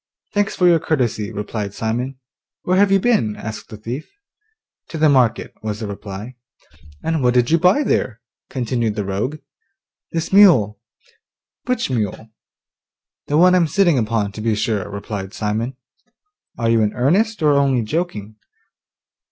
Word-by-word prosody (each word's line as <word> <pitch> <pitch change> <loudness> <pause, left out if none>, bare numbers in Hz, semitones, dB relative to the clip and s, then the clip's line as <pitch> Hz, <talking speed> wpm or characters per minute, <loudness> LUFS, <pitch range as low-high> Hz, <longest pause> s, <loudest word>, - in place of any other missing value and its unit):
'Thanks 205 0 0
for 180 - +3
your 170 -2 +5
courtesy,' 125 -9 -1
replied 105 -1 -5
Simon. 120 +4 -2 0.5
'Where 185 +1 +1
have 200 -1 +4
you 195 - +5
been?' 185 - +1
asked 110 0 -7
the 110 - -9
thief. 120 +7 -6 0.8
'To 165 - -5
the 155 0 +4
market,' 125 -5 +2
was 105 -1 -4
the 110 - -4
reply. 100 +4 -7 0.7
'And 165 -2 0
what 125 -1 +2
did 125 +1 +3
you 165 - +4
buy 185 - +4
there?' 125 - -1 0.3
continued 120 -4 -1
the 105 -2 -2
rogue. 105 +10 -2 0.7
'This 165 +2 -3
mule.' 125 - +6 0.9
'Which 250 - -1
mule?' 110 -1 -3 1.0
'The 145 - +1
one 180 +2 +6
I'm 175 -3 +4
sitting 170 -3 +3
upon, 110 -2 -1
to 105 - -8
be 110 -1 +1
sure,' 105 -2 -1
replied 100 0 -6
Simon. 115 +4 -2 0.8
'Are 115 -1 +1
you 115 -1 +3
in 105 -1 +1
earnest, 190 - +1
or 150 -1 +5
only 135 -4 +2
joking? 110 - -3
120 Hz, 150 wpm, -20 LUFS, 105-160 Hz, 1.0 s, mule